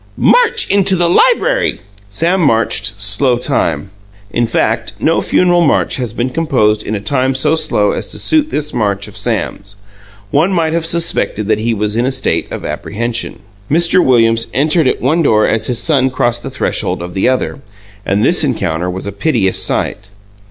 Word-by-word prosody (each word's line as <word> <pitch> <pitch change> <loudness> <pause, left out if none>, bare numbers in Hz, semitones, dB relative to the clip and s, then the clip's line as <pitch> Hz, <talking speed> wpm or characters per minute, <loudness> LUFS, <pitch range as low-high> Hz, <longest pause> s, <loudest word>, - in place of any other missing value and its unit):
"March 480 -1 +3
into 195 -1 +4
the 175 -1 +1
library!" 475 - +2 0.3
Sam 170 - 0
marched 110 -6 0
slow 105 +6 +1
time. 95 - -2 0.4
In 120 +2 0
fact, - - -1
no - - +1
funeral 175 -1 +2
march 155 - +1
has 125 -4 -3
been 120 +3 -3
composed 125 -9 +1
in 110 - -4
a - - -3
time 130 +5 -1
so 150 +4 +1
slow 155 -11 +1
as - - -4
to - - -6
suit 310 -1 +1
this 150 - -3
march 100 -3 -1
of 105 - -10
Sam's. 100 -2 -3 0.6
One 160 +7 +2
might 165 -3 0
have 165 -1 -1
suspected 135 -11 0
that 110 -1 +2
he 115 +1 -1
was 105 0 -2
in 120 +2 0
a - - 0
state - - -1
of - - -6
apprehension. 115 +1 -4 0.3
Mr. 170 +3 +3
Williams 115 -3 +2
entered 150 +2 +2
at - - -1
one 155 +6 +2
door 110 -8 +3
as 110 0 +1
his 125 - -1
son 130 +1 +2
crossed 120 -1 -1
the - - -6
threshold - - -2
of 90 0 -7
the 95 +6 +1
other, 130 +1 -2 0.4
and 100 +3 0
this 175 -1 +3
encounter 90 - -1
was 95 +2 -5
a 100 - -4
piteous 100 -3 0
sight. 95 -2 -2
120 Hz, 180 wpm, -14 LUFS, 105-160 Hz, 0.6 s, into